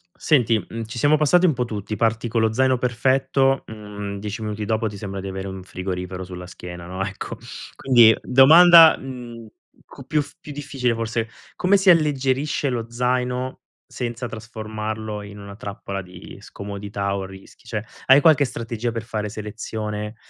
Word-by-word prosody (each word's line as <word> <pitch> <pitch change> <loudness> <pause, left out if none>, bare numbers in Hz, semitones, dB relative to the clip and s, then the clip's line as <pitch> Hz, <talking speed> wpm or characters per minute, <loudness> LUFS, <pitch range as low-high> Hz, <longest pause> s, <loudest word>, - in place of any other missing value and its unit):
Senti, 120 -7 +2
mhmm, 115 +2 -7
ci 120 +2 -7
siamo 150 +3 +4
passati 175 +5 +4
un 160 - +3
po' 125 -1 -1
tutti, 105 -2 -5
parti 115 +2 0
con 115 0 0
lo 110 -1 +1
zaino 130 +1 +2
perfetto, 130 +2 +1
mhmm, 105 -2 -7
10 105 +2 -5
minuti 105 0 -4
dopo 110 +1 0
ti 105 - -7
sembra 100 -1 -6
di 95 - -6
avere 95 0 -5
un 95 -1 -7
frigorifero 90 0 -5
sulla 90 -1 -8
schiena, 90 -1 -9
no, 95 +2 -4
ecco. 95 0 -6 0.4
Quindi, 120 -4 +6
domanda, 160 +5 +8
mhmm, 120 -3 -9 0.4
cu - - -13
più 150 -1 +1
f - - -10
più 150 - -10
difficile 135 -4 -2
forse, 115 0 -2 0.3
come 195 +2 +3
si 195 0 +3
alleggerisce 145 -3 +2
lo 120 -2 -2
zaino 125 +1 -1 0.3
senza 120 0 -4
trasformarlo 110 -1 -6
in 100 0 -10
una 100 0 -10
trappola 100 -2 -6
di 90 -1 -12
scomodità 100 0 -5
o 95 -1 -3
rischi? 95 +3 -14
Cioè, 110 -2 -4 0.2
hai 135 +2 +7
qualche 145 -3 +5
strategia 115 -1 -4
per 115 0 -4
fare 105 -2 -4
selezione, 105 0 -5
115 Hz, 170 wpm, -22 LUFS, 100-130 Hz, 0.4 s, domanda